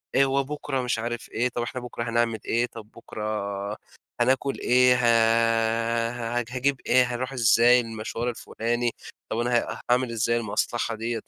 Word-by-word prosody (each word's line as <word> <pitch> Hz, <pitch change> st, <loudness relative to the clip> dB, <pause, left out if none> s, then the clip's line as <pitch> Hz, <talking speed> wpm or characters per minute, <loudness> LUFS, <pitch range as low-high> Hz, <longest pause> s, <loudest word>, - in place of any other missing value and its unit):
إيه 135 Hz, -, +5 dB
هو 135 Hz, +1 st, +1 dB
بُكرة 145 Hz, -1 st, -3 dB
مش 125 Hz, -2 st, -1 dB
عارف 120 Hz, +1 st, -4 dB
إيه، 120 Hz, +2 st, 0 dB
طب 120 Hz, -, -4 dB
إحنا 125 Hz, +2 st, -4 dB
بُكرة 120 Hz, -1 st, -5 dB
هنعمل 115 Hz, -1 st, +1 dB
إيه، 120 Hz, +1 st, +1 dB
طب 115 Hz, -3 st, -11 dB
بُكرة 105 Hz, -2 st, -4 dB, 0.4 s
هناكل 135 Hz, +1 st, +1 dB
إيه، 125 Hz, 0 st, +4 dB
ه 115 Hz, 0 st, +2 dB
هاج 120 Hz, -, -3 dB
هاجيب 135 Hz, +2 st, 0 dB
إيه، 125 Hz, +1 st, +5 dB
هاروح 130 Hz, +2 st, -3 dB
إزاي 120 Hz, 0 st, +5 dB
المشوار 115 Hz, +1 st, -4 dB
الفُلاني، 120 Hz, 0 st, -2 dB, 0.4 s
طب 110 Hz, -, -1 dB
أنا 120 Hz, 0 st, +2 dB
ه -, -, -9 dB
هاعمل 125 Hz, 0 st, +2 dB
إزاي 115 Hz, +1 st, +1 dB
المصلحة 115 Hz, +1 st, -1 dB
ديّة؟ 115 Hz, +1 st, -3 dB
120 Hz, 160 wpm, -25 LUFS, 115-125 Hz, 0.4 s, إيه